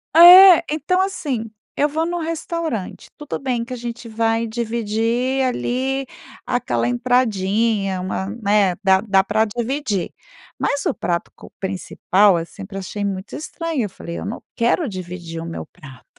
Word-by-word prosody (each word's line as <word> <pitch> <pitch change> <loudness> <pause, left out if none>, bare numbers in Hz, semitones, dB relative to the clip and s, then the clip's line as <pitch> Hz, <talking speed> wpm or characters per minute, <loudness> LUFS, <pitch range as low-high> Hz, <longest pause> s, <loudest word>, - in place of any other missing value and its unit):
É, 355 +1 +10
então 365 +5 +1
assim, 285 - -2 0.3
eu 295 - +2
vou 315 +2 -1
num 350 +1 -2
restaurante, 325 - -4
tudo 295 - -5
bem 250 -3 -1
que 245 +2 -7
a - - -3
gente 235 -1 -7
vai 225 +1 0
dividir 235 +3 -1
ali 260 +2 -1 0.4
aquela 120 - -1
entradinha, 200 - +1
uma, 190 +1 -3
né, 200 -3 +3
dá 190 0 +4
dá 195 -3 +3
pra 220 +3 +1
dividir. 235 - -2 0.5
Mas 285 - -1
o - - +1
prato 175 -3 -3
co - - -14
principal 190 -1 +2
sempre 195 +3 -9
achei 205 +2 -4
muito 195 0 -4
estranho. 325 -3 -3
Eu 210 - -3
falei: 170 -2 -8
"Eu - - -6
não 220 - -5
quero 240 +6 +1
dividir 175 -3 -7
o 165 - -6
meu 165 - -6
prato!". 135 -4 -15
225 Hz, 150 wpm, -20 LUFS, 190-270 Hz, 0.5 s, É